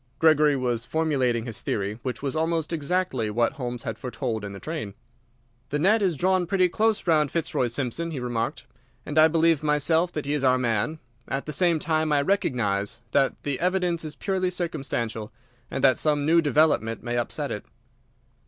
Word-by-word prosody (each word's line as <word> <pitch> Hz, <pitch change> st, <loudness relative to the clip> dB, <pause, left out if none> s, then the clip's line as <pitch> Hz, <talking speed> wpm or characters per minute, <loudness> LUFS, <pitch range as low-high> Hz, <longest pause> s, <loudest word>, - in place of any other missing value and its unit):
Gregory 155 Hz, -2 st, +4 dB
was 120 Hz, -3 st, -1 dB
formulating 130 Hz, -7 st, 0 dB
his 115 Hz, -4 st, -5 dB
theory, 105 Hz, +2 st, -2 dB
which 125 Hz, 0 st, -4 dB
was 140 Hz, 0 st, -2 dB
almost 160 Hz, 0 st, 0 dB
exactly 155 Hz, -7 st, -1 dB
what 115 Hz, +2 st, +1 dB
Holmes 125 Hz, -4 st, -5 dB
had 115 Hz, -4 st, -5 dB
foretold 120 Hz, -3 st, -3 dB
in 100 Hz, -, -5 dB
the 100 Hz, -, -8 dB
train. 130 Hz, -10 st, -5 dB, 0.7 s
"The 145 Hz, -, -1 dB
net 205 Hz, +8 st, +3 dB
is 185 Hz, -5 st, +2 dB
drawn 185 Hz, +1 st, +2 dB
pretty 185 Hz, 0 st, +3 dB
close 220 Hz, +3 st, +1 dB
round 155 Hz, -4 st, +3 dB
Fitzroy 160 Hz, -6 st, -1 dB
Simpson," 135 Hz, +7 st, -2 dB
he 150 Hz, -5 st, -4 dB
remarked, 120 Hz, -2 st, -3 dB, 0.4 s
"and 150 Hz, +1 st, +1 dB
I 155 Hz, -, +8 dB
believe 165 Hz, -1 st, +3 dB
myself 155 Hz, +3 st, +2 dB
that 150 Hz, -, -3 dB
he 145 Hz, -, -1 dB
is 145 Hz, -2 st, -1 dB
our 130 Hz, -1 st, +4 dB
man. 120 Hz, +5 st, 0 dB, 0.3 s
At 135 Hz, -, -3 dB
the 150 Hz, -, -4 dB
same 170 Hz, +1 st, +3 dB
time 155 Hz, 0 st, 0 dB
I 145 Hz, -1 st, +3 dB
recognise 115 Hz, -, 0 dB
that 135 Hz, +1 st, +1 dB
the 140 Hz, -3 st, -2 dB
evidence 180 Hz, -2 st, 0 dB
is 155 Hz, -1 st, -6 dB
purely 190 Hz, +1 st, -1 dB
circumstantial, 135 Hz, -11 st, -3 dB, 0.4 s
and -, -, -4 dB
that 130 Hz, -1 st, +5 dB
some 150 Hz, -2 st, +1 dB
new 165 Hz, +2 st, +5 dB
development 150 Hz, -7 st, +2 dB
may 120 Hz, 0 st, -2 dB
upset 120 Hz, -1 st, -2 dB
it." -, -, -4 dB
150 Hz, 180 wpm, -25 LUFS, 120-165 Hz, 0.7 s, I